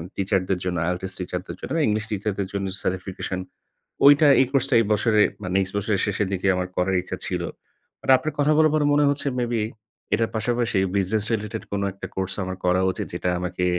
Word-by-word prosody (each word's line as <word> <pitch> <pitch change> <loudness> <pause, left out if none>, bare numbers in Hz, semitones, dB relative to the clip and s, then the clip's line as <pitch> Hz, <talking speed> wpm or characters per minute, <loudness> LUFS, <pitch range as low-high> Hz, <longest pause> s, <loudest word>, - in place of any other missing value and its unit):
টিচারদের 95 -1 0
জন্য 90 -1 -1
IELTS 95 +1 -3
টিচারদের 90 +1 -5
জন্য, - - -6 0.2
ইংলিশ 105 0 0
টিচারদের 100 -1 -2
জন্য 100 0 -2 0.2
certification। 95 0 -3 0.7
ওইটা 145 +1 +7
এই 130 - +4
কোর্সটা 135 -1 +1
এই - - +2
বছরে 105 0 +3 0.2
বা 90 - -4
নেক্সট 95 -1 0
বছরের 100 -1 0
শেষের 105 -1 -1
দিকে 95 0 -2
আমার 90 0 -2
করার 95 +1 +1
ইচ্ছা 95 +1 -5
ছিল। 90 -2 -2 0.6
বাট - - -1
আপনার 145 +4 -4
কথা 145 +1 +3
বলা 155 0 +6
পরে 155 -1 +2
মনে 145 0 +4
হচ্ছে 140 0 -1
মেবি, 120 -2 0 0.5
এটার 115 0 +1
পাশাপাশি 120 -1 0 0.2
business 100 +2 +1
related 110 0 -4
কোনো 100 0 -1
১ - - -24
টা 95 - -2
কোর্স 95 0 -1
আমার 95 0 -4
করা 90 +1 +3
উচিত - - -4
যেটা - - -2
আমাকে 90 0 -2
100 Hz, 190 wpm, -24 LUFS, 95-115 Hz, 0.7 s, ওইটা